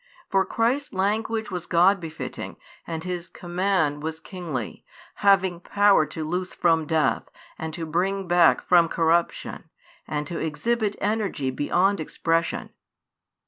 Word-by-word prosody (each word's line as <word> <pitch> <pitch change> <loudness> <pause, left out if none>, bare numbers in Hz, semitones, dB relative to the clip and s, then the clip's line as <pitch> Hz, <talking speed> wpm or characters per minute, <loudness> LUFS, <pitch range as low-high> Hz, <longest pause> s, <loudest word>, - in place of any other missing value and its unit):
For 195 -1 +3
Christ's 250 +6 0
language 215 +3 -1
was 180 -2 -4
God 180 +4 +4
befitting 160 -2 -7 0.3
and 160 -1 -4
His 180 -1 -4
command 175 -5 0
was 160 +1 -4
kingly, 160 - -6 0.4
having 190 -3 +4
power 200 -3 +3
to 155 +2 -5
loose 180 +4 -3
from 165 -3 +2
death, 160 -3 +1 0.3
and 160 0 -4
to 165 -2 -4
bring 190 +4 -1
back 175 -1 +4
from 170 -2 +6
corruption, 170 +1 0 0.4
and 150 -1 -2
to 165 +3 -5
exhibit 205 +8 -1
energy 205 -10 -1
beyond 180 +9 +1
expression. 165 +1 -1
175 Hz, 130 wpm, -25 LUFS, 160-195 Hz, 0.4 s, from